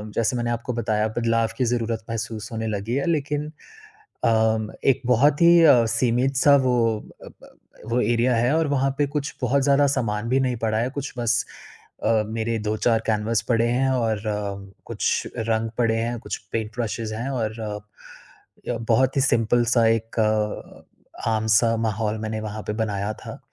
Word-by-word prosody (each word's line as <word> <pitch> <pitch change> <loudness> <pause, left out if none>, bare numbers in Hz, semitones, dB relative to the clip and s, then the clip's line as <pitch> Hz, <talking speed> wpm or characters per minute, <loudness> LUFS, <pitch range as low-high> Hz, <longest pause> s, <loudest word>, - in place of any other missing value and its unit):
जैसे 115 +2 +1
मैंने 120 0 -1
आपको 120 +1 -3
बताया, 110 -2 0
बदलाव 115 -1 +2
की 130 - +1
ज़रूरत 115 -2 -2
महसूस 115 0 -4
होने 110 0 -3
लगी 110 +3 -2
है। 140 - 0
लेकिन 150 -2 -1 0.8
अ, - - +4 0.6
एक 135 0 +3
बहुत 140 +5 +3
ही 170 0 +7
अ, 125 -7 +6
सीमित-सा 130 +5 +3
वो 125 -1 +2 0.5
अ, - - -9
ब - - -17
अ, - - -19 0.3
वो 125 +1 +2
एरिया 120 +2 +2
है 120 +4 +2
और 165 - +2
वहाँ 135 -1 +1
पे 145 - +2
कुछ 140 0 -4
बहुत 135 +3 +2
ज़्यादा 140 +1 +4
सामान 110 -2 -2
भी 130 +2 +2
नहीं 125 -2 0
पड़ा 110 -1 -1
है। 120 +3 0
कुछ 140 0 -5
बस 120 0 +1 0.6
अ, 110 0 +3
मेरे 115 +1 -2
2-4 110 +2 +1
कैनवास 110 0 0
पड़े 115 -1 +2
हैं 130 +2 +1
और 115 -4 -1
अ, 100 -2 -4
कुछ - - -1
रंग 110 0 -1
पड़े 115 -2 +2
हैं, 120 +1 -2
कुछ - - -5 0.2
पेंट 110 -1 -2
ब्रशेस 115 -1 -3
हैं 115 +4 -4
और 115 -4 -3
अ, 105 -1 -4 0.9
य 120 - -1
बहुत 130 +4 +3
ही 135 - +4
सिंपल-सा 120 -1 +2
एक 115 0 -1
अ, 110 +1 -3
आम-सा 110 +1 +2
माहौल 110 -1 -1
मैंने 110 0 -4
वहाँ 105 0 -6
पे - - 0
बनाया 105 0 -2
था। - - -10
115 Hz, 175 wpm, -23 LUFS, 110-125 Hz, 0.9 s, ही